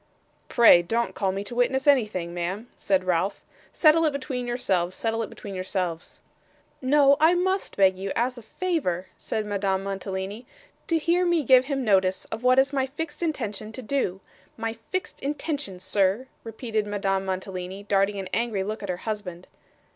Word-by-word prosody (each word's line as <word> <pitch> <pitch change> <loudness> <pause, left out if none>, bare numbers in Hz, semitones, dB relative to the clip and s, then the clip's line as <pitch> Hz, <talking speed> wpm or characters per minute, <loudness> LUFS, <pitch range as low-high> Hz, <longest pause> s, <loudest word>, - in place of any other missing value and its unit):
'Pray 230 -7 +7
don't 230 +7 -1
call 195 -2 0
me 195 +1 -3
to 205 - -7
witness 265 +3 +1
anything, 210 -11 +2
ma'am,' 180 +6 -3
said 190 -2 0
Ralph. 185 +2 0 0.3
'Settle 320 0 +5
it 305 - +3
between 260 -3 -4
yourselves, 185 -7 0
settle 225 0 -1
it 225 - -4
between 200 - -9
yourselves.' 185 -3 -4 0.6
'No, 280 +1 +5
but - - 0
I 335 +3 +6
must 375 +2 -1
beg 190 -1 +5
you 190 +1 -4
as 250 +2 0
a 240 - -9
favour,' 220 - -2
said 220 -1 -3
Madame 195 -2 -1
Mantalini, 195 +3 -4 0.4
'to 330 - +2
hear 340 +3 +2
me 345 -3 +2
give 255 0 +6
him 270 -2 -2
notice 190 -3 +2
of 225 - -4
what 255 +1 +4
it - - +9
is 275 +1 -2
my 265 -1 +1
fixed 295 +4 -6
intention 220 - -3
to 255 - -7
do 215 -7 -1 0.4
my 225 0 -2
fixed 230 - -5
intention, 285 - -3
sir,' 195 +5 +1 0.2
repeated 220 -1 -3
Madame 195 -2 0
Mantalini, 190 0 -4
darting 200 0 +1
an 190 -1 -4
angry 225 -4 0
look 215 +3 -4
at 200 - -6
her 180 - -1
husband. 200 -5 -4
215 Hz, 175 wpm, -26 LUFS, 190-265 Hz, 0.6 s, it